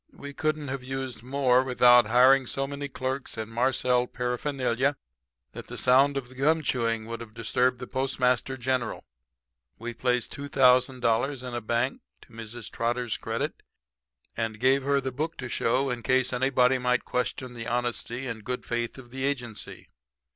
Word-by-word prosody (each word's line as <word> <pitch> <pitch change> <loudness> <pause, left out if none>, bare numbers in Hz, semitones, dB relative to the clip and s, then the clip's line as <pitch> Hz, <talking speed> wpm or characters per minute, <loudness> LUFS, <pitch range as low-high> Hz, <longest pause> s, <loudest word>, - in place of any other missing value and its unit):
We 140 0 -8
couldn't 155 -1 -1
have 135 0 -3
used 130 -2 -5
more 130 0 +2
without 125 -2 +6
hiring 130 +3 +5
so 135 - -1
many 140 +1 -5
clerks 130 0 -4
and 110 0 -5
marcelled 125 +1 +1
paraphernalia 125 +1 0 0.6
that - - -9
the - - -7
sound 135 +3 +4
of 130 -3 -4
the 130 - -15
gum 155 +5 +2
chewing 115 -4 0
would 115 +1 -6
have 110 -2 -11
disturbed 125 +3 +1
the 125 - -5
Postmaster 130 0 0
General. 130 -1 -2 0.7
"We 120 +1 -6
placed 125 0 -1
$2,000 130 -1 +2
in 125 - -6
a 120 - -2
bank 120 +4 -1 0.2
to 120 - -19
Mrs. 115 0 -8
Trotter's 120 0 -1
credit - - -3 0.7
and 110 -2 -3
gave 135 +3 +4
her 140 +1 +1
the 130 0 -3
book 155 +6 -3
to 130 - -5
show 130 +3 +1
in 120 -1 -3
case 130 +1 +1
anybody 130 0 +3
might 125 0 +1
question 125 0 -2
the 115 -1 -6
honesty 120 +1 -2
and 115 -4 -5
good 125 +3 -4
faith 120 +1 -2
of 120 -2 -12
the 130 +1 -5
agency. 125 -6 -4
125 Hz, 165 wpm, -27 LUFS, 120-135 Hz, 0.7 s, without